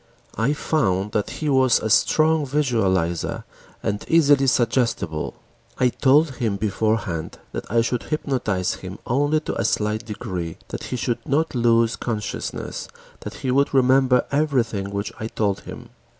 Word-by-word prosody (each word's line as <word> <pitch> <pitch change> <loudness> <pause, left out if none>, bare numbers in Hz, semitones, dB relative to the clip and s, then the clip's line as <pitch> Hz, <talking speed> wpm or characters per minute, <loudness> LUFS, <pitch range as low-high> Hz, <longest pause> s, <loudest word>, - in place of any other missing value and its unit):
I 115 +7 +1
found 105 - 0
that 105 -2 -1
he 155 - -4
was 130 -3 +4
a 110 - -2
strong 155 +5 +3
visualizer 100 - 0 0.4
and 105 +1 -2
easily 145 -4 +4
suggestible. 115 - 0 0.4
I 125 - +3
told 140 +2 +3
him 110 -4 0
beforehand 105 -5 -1
that - - -6
I 115 0 +4
should 120 +1 -1
hypnotize 125 - -1
him 95 +1 -7
only 145 +5 +1
to - - -4
a - - 0
slight 105 +1 0
degree, 95 -7 -5
that - - -6
he 125 - -3
would 120 - -1
not 155 +3 +1
lose 115 -2 +3
consciousness, 110 -4 -4 0.3
that - - -8
he 130 - +1
would 140 +2 +2
remember 130 -1 +4
everything 125 -9 0
which 100 +1 -4
I 110 - -3
told 100 -3 -1
him. - - -10
120 Hz, 150 wpm, -23 LUFS, 105-135 Hz, 0.4 s, was